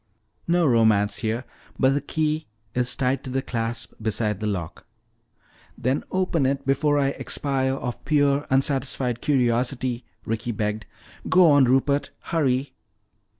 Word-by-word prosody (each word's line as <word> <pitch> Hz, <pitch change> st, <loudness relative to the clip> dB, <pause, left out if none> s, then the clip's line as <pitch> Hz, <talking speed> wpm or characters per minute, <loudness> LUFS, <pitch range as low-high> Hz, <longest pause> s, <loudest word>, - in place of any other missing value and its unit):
"No 175 Hz, 0 st, +3 dB
romance 110 Hz, -5 st, +3 dB
here. 115 Hz, +2 st, -2 dB, 0.3 s
But 130 Hz, 0 st, +4 dB
the 145 Hz, -, 0 dB
key 155 Hz, +2 st, -1 dB, 0.3 s
is 125 Hz, 0 st, +1 dB
tied 135 Hz, 0 st, 0 dB
to -, -, -7 dB
the 130 Hz, +1 st, -1 dB
clasp 115 Hz, -2 st, -4 dB
beside 110 Hz, -2 st, -1 dB
the 110 Hz, -, -2 dB
lock." 90 Hz, -6 st, -5 dB, 0.9 s
"Then 130 Hz, +3 st, 0 dB
open 180 Hz, -7 st, +1 dB
it 140 Hz, 0 st, -1 dB
before 145 Hz, +2 st, +2 dB
I 140 Hz, -1 st, +2 dB
expire 135 Hz, -1 st, -1 dB
of 125 Hz, -2 st, -5 dB
pure 145 Hz, -1 st, +2 dB
unsatisfied 130 Hz, -2 st, +1 dB
curiosity," 125 Hz, -2 st, 0 dB, 0.2 s
Ricky 115 Hz, +2 st, -2 dB
begged. 105 Hz, 0 st, -3 dB, 0.4 s
"Go 180 Hz, -4 st, +6 dB
on, 145 Hz, -2 st, +6 dB
Rupert. 135 Hz, +3 st, +2 dB
Hurry." 135 Hz, -4 st, -1 dB
130 Hz, 135 wpm, -24 LUFS, 115-140 Hz, 0.9 s, Go